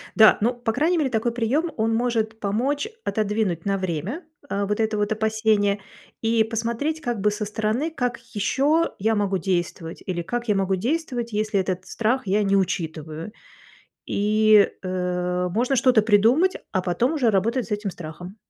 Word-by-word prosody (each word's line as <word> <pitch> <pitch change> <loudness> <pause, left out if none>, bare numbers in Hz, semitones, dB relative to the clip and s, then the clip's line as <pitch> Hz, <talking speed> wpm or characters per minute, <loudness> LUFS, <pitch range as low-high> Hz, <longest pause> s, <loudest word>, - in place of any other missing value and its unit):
Да, 220 -1 +7
ну, 235 +4 +2
по 240 -2 -2
крайней 320 +8 +1
мере, 285 -4 +1
такой 230 0 0
прием, 265 +9 0
он 225 0 +1
может 225 -2 -1
помочь 255 - -1 0.2
отодвинуть 210 - -1
на 195 0 +1
время, 185 - -3 0.3
а, 200 0 -1
вот 210 +2 -2
это 220 -1 0
вот 210 +1 0
опасение 220 -2 +1 0.4
и 225 0 +3
посмотреть 235 +8 -2
как 240 -6 -2
бы 210 - +3
со 210 0 -3
стороны, 220 +9 -1
как 250 -5 -2
еще 280 +10 +1
я 220 +3 +1
могу 200 -2 0
действовать 175 -3 -3
или 175 -2 -2
как 240 +6 -4
я 210 - +2
могу 195 0 +1
действовать, 245 - -2
если 215 -1 0
этот 185 -1 -2
страх 230 +1 -1
я 205 +3 +2
не 200 0 +2
учитываю. 160 -2 -2 0.7
И, 215 0 +4
э, 180 0 -1
можно 245 +8 +1
что-то 245 -2 +5
придумать, 230 - +3 0.2
а 185 - +1
потом 185 - 0
уже 265 -7 +2
работать 225 +5 +1
с 215 - -15
этим 210 -1 -1
страхом. 180 +2 -9
215 Hz, 170 wpm, -24 LUFS, 195-240 Hz, 0.7 s, Да